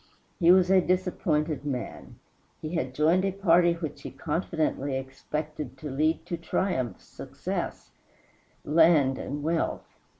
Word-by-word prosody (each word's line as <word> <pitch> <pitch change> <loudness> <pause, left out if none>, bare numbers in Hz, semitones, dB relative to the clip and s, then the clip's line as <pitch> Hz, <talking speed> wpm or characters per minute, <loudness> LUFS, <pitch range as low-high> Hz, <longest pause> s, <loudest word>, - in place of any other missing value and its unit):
He 170 -1 +6
was 185 0 +5
a 190 -1 +6
disappointed 170 -5 0
man. 130 -5 -5 0.4
He 155 +2 -6
had 130 -6 -2
joined 165 +6 +3
a 195 - +1
party 175 -3 +4
which 165 -4 -6
he - - -6
confidently 155 -4 -2
expected 145 +1 -5
to 150 +1 -6
lead 155 +4 0
to 170 - -3
triumph, 165 - -1
success, - - -6 0.7
and 145 -3 +3
wealth. 165 +1 -1
160 Hz, 125 wpm, -27 LUFS, 145-175 Hz, 0.7 s, He